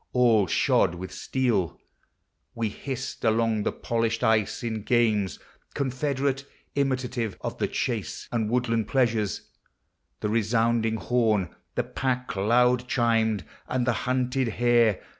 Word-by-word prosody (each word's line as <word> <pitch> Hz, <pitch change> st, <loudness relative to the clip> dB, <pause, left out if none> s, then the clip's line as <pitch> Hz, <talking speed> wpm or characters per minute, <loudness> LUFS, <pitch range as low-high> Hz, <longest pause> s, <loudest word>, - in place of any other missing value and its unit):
All 115 Hz, -6 st, +4 dB
shod 85 Hz, -, +2 dB
with 90 Hz, +1 st, -7 dB
steel, 100 Hz, -, -1 dB, 0.8 s
We 115 Hz, -2 st, -1 dB
hissed 130 Hz, +4 st, -6 dB
along 110 Hz, -1 st, +2 dB
the -, -, 0 dB
polished 115 Hz, 0 st, -1 dB
ice, 110 Hz, -3 st, +2 dB
in 110 Hz, -2 st, -2 dB
games 110 Hz, -4 st, +1 dB, 0.4 s
Confederate, 135 Hz, 0 st, -1 dB, 0.3 s
imitative 130 Hz, -5 st, -1 dB
of -, -, -5 dB
the -, -, +1 dB
chase -, -, -3 dB
Ami 115 Hz, -3 st, 0 dB
woodland 115 Hz, -2 st, 0 dB
pleasures, 115 Hz, -6 st, +1 dB, 0.8 s
the -, -, 0 dB
resounding 115 Hz, +1 st, +1 dB
horn, 110 Hz, -6 st, +1 dB, 0.2 s
The -, -, +1 dB
pack 125 Hz, -3 st, -2 dB
loud 125 Hz, +5 st, +3 dB
chiming, 115 Hz, -4 st, +1 dB, 0.2 s
and 125 Hz, -1 st, 0 dB
the 125 Hz, -, +2 dB, 0.2 s
hunted 130 Hz, 0 st, +1 dB
hare. 120 Hz, -2 st, +3 dB
115 Hz, 120 wpm, -26 LUFS, 110-125 Hz, 0.8 s, All